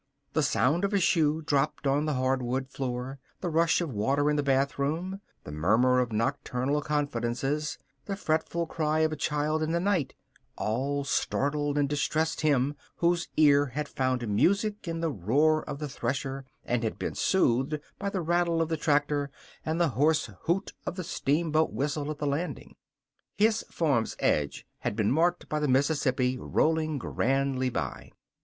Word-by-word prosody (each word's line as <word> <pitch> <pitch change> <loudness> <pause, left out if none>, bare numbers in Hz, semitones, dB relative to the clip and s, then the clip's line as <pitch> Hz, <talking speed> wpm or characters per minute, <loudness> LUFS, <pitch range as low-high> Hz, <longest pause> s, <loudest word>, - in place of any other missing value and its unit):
The 155 - +2
sound 145 - +2
of 200 +1 +1
a - - +4
shoe 160 -3 +2
dropped 145 0 0
on 140 +2 +2
the 150 - 0
hardwood 130 0 0
floor, 130 +1 -4 0.2
the 180 - -2
rush 165 +2 +3
of 160 -7 -3
water 140 +8 +1
in - - +1
the 145 - +2
bathroom, 140 +7 0 0.2
the - - -8
murmur 110 +12 +3
of 125 -2 0
nocturnal 130 +4 -1
confidences, 145 0 -1 0.3
the 200 - -3
fretful 170 -1 -1
cry 155 -1 0
of 160 0 +2
a - - -2
child 150 +1 0
in 155 +1 0
the 170 - +2
night, 175 -8 0 0.4
all 135 +6 -1
startled 145 +1 0
and 145 -1 +2
distressed 155 +2 0
him 145 -2 +2 0.2
whose 170 0 +1
ear 145 -2 +5
had 145 +4 -4
found 130 -3 -1
music 200 - +1
in 165 0 -3
the 165 -1 0
roar 145 - +2
of 145 - -4
the 150 0 -4
thresher 135 0 -3 0.2
and 120 -1 0
had 110 - -2
been - - -3
soothed 145 -4 +1 0.2
by 200 - -1
the 195 -2 -2
rattle 170 0 +1
of 165 -1 0
the 160 - 0
tractor 145 -1 +1 0.3
and 160 +2 -1
the 170 -2 +3
hoarse 145 +1 +1
hoot 185 +4 0
of - - -2
the 185 - -4
steamboat 160 0 +1
whistle 145 +6 -2
at 155 - -4
the 150 - -3
landing. 145 +5 -3 0.6
His 220 +1 +3
farm's 140 -9 0
edge 75 -1 0
had - - -2
been 105 -2 +1
marked 175 +5 +1
by 150 - -1
the 150 - 0
Mississippi 130 -2 +1
rolling 155 +1 +1
grandly 135 +1 0
by. - - -4
145 Hz, 170 wpm, -28 LUFS, 130-160 Hz, 0.6 s, ear